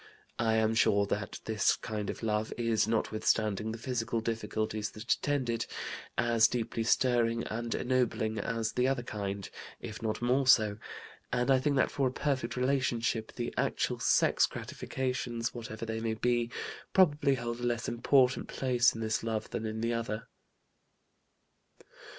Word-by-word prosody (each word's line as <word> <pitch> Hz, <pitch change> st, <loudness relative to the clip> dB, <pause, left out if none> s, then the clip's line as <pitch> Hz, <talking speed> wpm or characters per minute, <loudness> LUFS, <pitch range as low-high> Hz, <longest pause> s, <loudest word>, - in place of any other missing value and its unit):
I 110 Hz, -1 st, +2 dB
am 110 Hz, 0 st, +2 dB
sure 100 Hz, -2 st, +3 dB
that 100 Hz, 0 st, -3 dB
this 110 Hz, -2 st, +2 dB
kind 105 Hz, -2 st, -4 dB
of -, -, -5 dB
love 110 Hz, 0 st, 0 dB
is, 115 Hz, -2 st, +1 dB
notwithstanding 110 Hz, -1 st, 0 dB
the 115 Hz, -, -5 dB
physical 115 Hz, -1 st, -2 dB
difficulties 110 Hz, -1 st, -2 dB
that 110 Hz, +2 st, 0 dB
attend 145 Hz, -3 st, -1 dB
it, 115 Hz, -1 st, -1 dB, 0.5 s
as 115 Hz, -2 st, +4 dB
deeply 115 Hz, -1 st, -2 dB
stirring 115 Hz, 0 st, +2 dB
and 115 Hz, +1 st, -3 dB
ennobling 120 Hz, -4 st, 0 dB
as 115 Hz, +2 st, -1 dB
the 125 Hz, +1 st, +1 dB
other 135 Hz, -2 st, 0 dB
kind, 100 Hz, -4 st, -4 dB, 0.3 s
if 115 Hz, -1 st, -7 dB
not 110 Hz, -1 st, -2 dB
more 125 Hz, +2 st, +2 dB
so; 105 Hz, -5 st, +5 dB, 0.5 s
and 125 Hz, +2 st, +1 dB
I 130 Hz, -, +5 dB
think 140 Hz, +2 st, +1 dB
that 135 Hz, -, +2 dB
for 135 Hz, -2 st, +1 dB
a -, -, -1 dB
perfect 130 Hz, -3 st, -1 dB
relationship 125 Hz, -4 st, 0 dB
the 120 Hz, -1 st, -4 dB
actual -, -, 0 dB
sex -, -, +4 dB
gratifications 125 Hz, -3 st, -3 dB
(whatever 115 Hz, -1 st, -6 dB
they 110 Hz, 0 st, -3 dB
may 110 Hz, 0 st, -1 dB
be) 120 Hz, +1 st, +1 dB, 0.4 s
probably 150 Hz, -6 st, +4 dB
hold 120 Hz, -1 st, -4 dB
a -, -, -6 dB
less 120 Hz, -1 st, -1 dB
important 125 Hz, +2 st, +3 dB
place 125 Hz, -3 st, +2 dB
in 115 Hz, -, -5 dB
this 110 Hz, 0 st, 0 dB
love 110 Hz, -1 st, -3 dB
than 110 Hz, -, -3 dB
in 110 Hz, 0 st, -4 dB
the 115 Hz, +1 st, 0 dB
other." 115 Hz, -1 st, -3 dB
115 Hz, 155 wpm, -31 LUFS, 110-125 Hz, 0.5 s, so